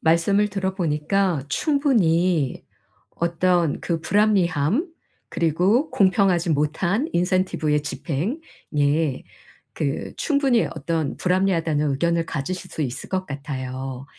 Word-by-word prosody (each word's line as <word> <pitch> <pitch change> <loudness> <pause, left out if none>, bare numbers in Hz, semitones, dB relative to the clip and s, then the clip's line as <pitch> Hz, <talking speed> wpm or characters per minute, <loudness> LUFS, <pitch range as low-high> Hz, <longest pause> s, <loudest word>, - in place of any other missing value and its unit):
말씀을 195 +6 +3
들어 190 -1 -2
보니까 170 0 0
충분히 185 - +1 0.5
어떤 170 -1 +1
그 165 -2 -2
불합리함 195 - +2 0.4
그리고 180 - +1
공평하지 185 -3 +2
못한 170 - 0
incentive의 175 -4 +1
집행 150 - -3 0.4
예 145 -1 +1 0.5
그 140 -1 -3
충분히 275 -6 +2
어떤 155 0 -2
불합리하다는 165 -5 +1
의견을 170 +4 0
가지실 180 +6 -4
수 155 - -3
있을 130 -1 -5
것 190 0 -1
같아요. 135 -3 -5
170 Hz, 275 characters per minute, -23 LUFS, 150-195 Hz, 0.5 s, 말씀을